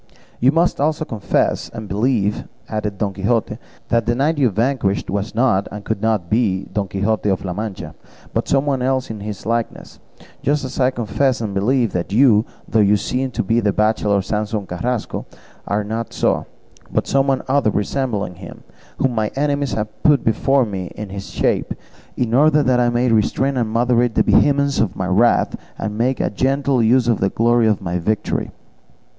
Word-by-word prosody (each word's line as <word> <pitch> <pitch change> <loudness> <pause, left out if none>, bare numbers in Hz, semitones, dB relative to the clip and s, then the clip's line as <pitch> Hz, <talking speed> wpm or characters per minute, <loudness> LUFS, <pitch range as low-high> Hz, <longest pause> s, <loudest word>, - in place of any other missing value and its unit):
"You 130 +3 +4
must 165 -1 +1
also 155 +1 0
confess 110 -7 -1
and 110 -2 -8
believe," 105 0 0 0.2
added 105 -2 -3
Don 100 -1 -1
Quixote, 110 +3 -1 0.3
"that 115 -1 +1
the 120 - +2
knight 145 +4 +1
you 130 -4 +4
vanquished 110 -2 0
was 100 +2 -3
not 110 -5 +2
and 105 0 -8
could 110 -2 -2
not 110 -5 0
be 105 -3 +1
Don 100 -2 -1
Quixote 105 +2 -1
of 95 0 -1
La 90 - -3
Mancha, 105 0 -5 0.4
but - - -1
some 135 +1 +2
one 135 -3 0
else 130 -1 0
in 110 - -6
his 105 -1 -7
likeness, 115 +1 -3 0.4
just 145 0 0
as 130 +1 -6
I 130 -1 +4
confess 130 +2 0
and 110 -3 -3
believe 115 +3 +1
that 90 +1 -3
you, 110 -1 +5 0.2
though 110 - +1
you 105 0 +4
seem 130 +6 -2
to - - -2
be 115 +4 +1
the 105 -3 +1
bachelor 105 -2 +1
Samson 105 0 -2
Carrasco, 115 +7 -3 0.4
are 105 +1 0
not 110 +2 -4
so, - - 0 0.4
but - - 0
some 135 -1 +1
other 135 -4 +2
resembling 105 -2 -2
him, 90 - -11 0.3
whom 130 -2 +1
my 110 -2 0
enemies 140 -3 0
have 105 +1 -2
here 150 - +6
put - - -17
before 135 +4 +2
me 95 -4 -5
in 105 -1 -6
his 100 0 -7
shape, - - -1 0.4
in 115 -2 -1
order 150 +3 +4
that 125 -2 +2
I 120 -1 +3
may 120 0 +1
restrain 130 +5 +1
and 120 -3 0
moderate 120 0 +2
the - - +4
vehemence 140 -1 +3
of 110 -5 0
my 95 - -2
wrath, 100 +6 +3 0.2
and 105 -1 -4
make 125 +2 0
a - - 0
gentle 135 +3 +1
use 120 +2 +3
of 115 -3 +2
the 95 - +1
glory 120 +1 +2
of 105 -3 0
my 90 0 -2
victory." 105 +5 -1
115 Hz, 190 wpm, -19 LUFS, 105-130 Hz, 0.4 s, here